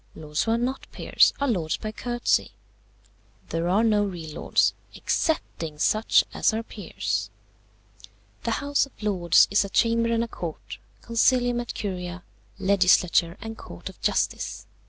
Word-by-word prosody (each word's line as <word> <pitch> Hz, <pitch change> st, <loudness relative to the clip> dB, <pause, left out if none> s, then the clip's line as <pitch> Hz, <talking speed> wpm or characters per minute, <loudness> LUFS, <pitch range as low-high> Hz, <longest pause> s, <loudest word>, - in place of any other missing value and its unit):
Lords 150 Hz, -1 st, -3 dB
who 225 Hz, -, 0 dB
are -, -, +2 dB
not 255 Hz, +3 st, -3 dB
peers -, -, +3 dB
are 280 Hz, -, +1 dB
lords 175 Hz, -, 0 dB
by 215 Hz, -, -5 dB
courtesy: 240 Hz, +2 st, 0 dB, 1.0 s
there 165 Hz, +1 st, -1 dB
are 200 Hz, +5 st, +3 dB
no 210 Hz, -2 st, +3 dB
real 170 Hz, -6 st, -5 dB
lords, -, -, +2 dB, 0.2 s
excepting 165 Hz, -, -2 dB
such 215 Hz, +8 st, +3 dB
as 220 Hz, -, +2 dB
are 225 Hz, -, -2 dB
peers. 100 Hz, -, -4 dB, 1.1 s
"The -, -, -3 dB, 0.2 s
House 285 Hz, -1 st, +2 dB
of 265 Hz, -, -17 dB
Lords 180 Hz, -5 st, +4 dB
is 200 Hz, -, +4 dB
a 200 Hz, -, -6 dB
chamber 230 Hz, +2 st, +2 dB
and 230 Hz, 0 st, +1 dB
a -, -, -3 dB
court, 115 Hz, -, -7 dB, 0.2 s
Concilium 245 Hz, +1 st, +2 dB
et 240 Hz, -, -7 dB
Curia, 180 Hz, -3 st, -5 dB, 0.3 s
legislature 185 Hz, -2 st, +3 dB
and 225 Hz, +1 st, -6 dB
court -, -, -9 dB
of -, -, -16 dB
justice. -, -, -1 dB
205 Hz, 150 wpm, -25 LUFS, 170-230 Hz, 1.1 s, Lords